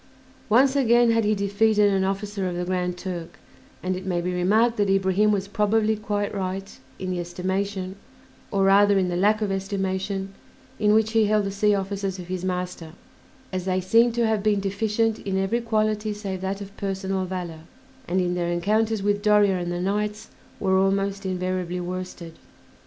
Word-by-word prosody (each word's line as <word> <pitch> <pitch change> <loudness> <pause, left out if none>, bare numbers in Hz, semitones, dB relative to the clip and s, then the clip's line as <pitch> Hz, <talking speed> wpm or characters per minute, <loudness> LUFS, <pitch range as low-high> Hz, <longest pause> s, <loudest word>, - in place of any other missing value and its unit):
Once 260 +5 +4
again 240 -3 +4
had 225 0 +2
he 210 +1 +2
defeated 205 +1 +2
an 190 -1 +2
officer 195 0 -2
of 175 - -4
the 175 0 -2
Grand 180 -1 -1
Turk; 175 -3 -6 0.5
and 185 0 -1
it 185 - -6
may 180 -2 -1
be 180 +1 -2
remarked 215 +7 +2
that 205 -1 +1
Ibrahim 195 +2 +3
was 200 -1 -1
probably 215 +1 +1
quite 205 -1 -2
right 195 0 -4 0.2
in 185 0 -4
the 180 - -2
estimation, 190 +2 -3 0.5
or 195 -1 +1
rather 200 +1 +5
in 185 -1 +1
the 175 - -2
lack 210 +4 +2
of 205 - -1
estimation, 195 0 -2 0.5
in 210 0 +4
which 220 0 +2
he 225 -1 +3
held 210 0 +2
the 195 - -2
sea 205 +1 +2
officers 195 -1 -3
of 180 -1 -9
his 185 -1 -3
master, 180 -3 -4 0.6
as 185 -1 -2
they 185 -1 +1
seem 230 +6 +4
to 235 0 +1
have 220 -2 +1
been 210 -1 +2
deficient 215 +3 0
in 195 -1 -2
every 195 +5 0
quality 215 -2 0
save 195 -3 -5
that 195 +1 -3
of 200 0 -9
personal 195 -1 -2
valor, 180 -3 -5 0.5
and 185 +2 +1
in 180 -1 0
their 175 -1 -1
encounters 210 +4 +1
with 205 0 +1
Doria 205 -3 +4
and 175 0 -3
the 175 - -2
knights 210 +3 -2 0.3
were 190 -1 +2
almost 195 0 0
invariably 185 -1 -2
worsted. 180 -2 -6
195 Hz, 185 wpm, -24 LUFS, 185-210 Hz, 0.6 s, rather